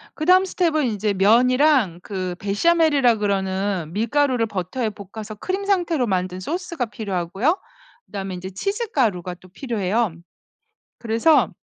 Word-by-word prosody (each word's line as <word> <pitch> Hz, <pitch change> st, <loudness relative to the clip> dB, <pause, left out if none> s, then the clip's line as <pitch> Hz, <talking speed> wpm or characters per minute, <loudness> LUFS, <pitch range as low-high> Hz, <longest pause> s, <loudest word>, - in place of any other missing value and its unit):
그다음 365 Hz, +4 st, +4 dB
스텝은 330 Hz, -6 st, +1 dB
인제 210 Hz, -2 st, -1 dB
면이랑 240 Hz, -, +3 dB
그 185 Hz, -3 st, -4 dB
베샤멜이라 275 Hz, -, +3 dB
그러는 195 Hz, -4 st, -1 dB
밀가루를 240 Hz, +3 st, +1 dB
버터에 215 Hz, +4 st, -3 dB
볶아서 210 Hz, +1 st, -9 dB
크림 375 Hz, -, -3 dB
상태로 345 Hz, -9 st, +1 dB
만든 185 Hz, -2 st, -2 dB
소스가 340 Hz, -, -3 dB
필요하고요. 210 Hz, -, -1 dB, 0.5 s
그다음에 195 Hz, -2 st, -5 dB
인제 185 Hz, +1 st, -6 dB
치즈 400 Hz, -, -3 dB
가루가 185 Hz, -, 0 dB
또 185 Hz, +1 st, -18 dB
필요해요. 215 Hz, -, -1 dB, 0.8 s
그래서 230 Hz, -, +3 dB
220 Hz, 330 characters per minute, -22 LUFS, 190-290 Hz, 0.8 s, 그다음